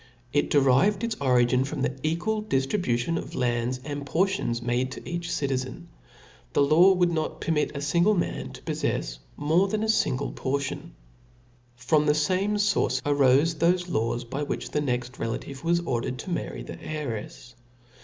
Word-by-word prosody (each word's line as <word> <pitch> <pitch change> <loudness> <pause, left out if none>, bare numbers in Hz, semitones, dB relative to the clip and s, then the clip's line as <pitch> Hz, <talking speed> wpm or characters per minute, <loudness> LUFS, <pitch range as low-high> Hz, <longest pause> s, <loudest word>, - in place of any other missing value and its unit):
It 145 - +2
derived 145 - +3
its 230 -1 -1
origin 125 -1 +3
from 140 0 -3
the 130 - -1
equal 170 +9 -1
diftribution 135 - 0
of - - -8
lands 120 +1 0
and 145 -1 -4
portions 170 -4 0
made 120 +2 -1
to - - -10
each 170 -1 -4
citizen. 130 -2 -3 0.6
The 145 - +4
law 170 +7 +6
would 180 -2 +2
.not 160 -2 -2
permit 150 -2 0
a - - -4
fingle 170 +8 +3
man 175 - -2
to - - -12
poffefs - - -2 0.2
more 160 +6 +2
than 215 +2 -1
a - - 0
fingle 145 -11 +1
portion. 135 0 -3 0.8
From 150 +5 +2
the 150 - +4
fame 190 +6 +1
fource 205 0 +1
arofe 145 +3 +3
thofe 175 +2 +2
laws 115 -2 0
by 130 +5 -5
which 145 - -3
the 150 - 0
next 125 -2 -2
relation 125 +4 -4
was 170 +1 +2
ordered 130 -5 -2
to 180 - -6
marry 170 - -3
the - - -8
heirefs. 125 -5 -5
145 Hz, 165 wpm, -26 LUFS, 130-175 Hz, 0.8 s, law